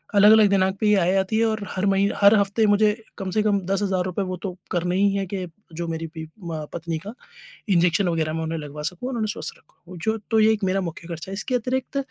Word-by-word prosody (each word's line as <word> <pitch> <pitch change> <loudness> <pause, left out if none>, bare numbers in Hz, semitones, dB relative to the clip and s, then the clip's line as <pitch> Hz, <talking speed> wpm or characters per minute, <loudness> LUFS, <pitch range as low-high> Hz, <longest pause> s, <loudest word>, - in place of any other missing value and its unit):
अलग-अलग 210 +1 +7
दिनांक 190 -1 +2
पे 215 - +1
ये 210 - +5
आय 180 +2 +2
आती 195 +3 0
है 230 - +3
और 220 -1 0
हर 190 +1 -2
मही 195 0 +3
हर 200 +2 +7
हफ्ते 200 +2 +2
मुझे 210 +1 +4 0.3
कम 195 -2 -4
से 215 - +2
कम 205 -2 +2
10,000 190 -1 0
रुपए 185 +2 -2
वो 185 -1 -4
तो 195 - -2 0.2
करने 175 0 0
ही 200 0 +3
है, 195 -1 -1
कि 185 -1 -4 0.3
जो 170 +1 -4
मेरी 165 0 -3
बी 160 - -5
अ, 160 -2 -7
पत्नी 165 -1 -3
का 210 - -6 0.6
इन्जेक्शन 175 0 +3
वग़ैरह 160 -2 -1
मैं 160 0 -2
उन्हें 160 +1 -3
लगवा 150 0 -7
सकूँ 180 +10 -3
और 265 - -4
उन्हें 220 -2 -1
स्वस्थ 155 - -6
रखूँ। 180 +3 -15
जो 220 +6 -1
तो 220 - +4
ये 215 +1 +5
एक 215 -1 -4
मेरा 190 +1 +1
मुख्य 170 -1 -6
खर्चा 170 +2 -6
है - - -4
इसके 215 +6 -2
अतिरिक्त 255 +3 -2
190 Hz, 250 wpm, -23 LUFS, 170-210 Hz, 0.6 s, अलग-अलग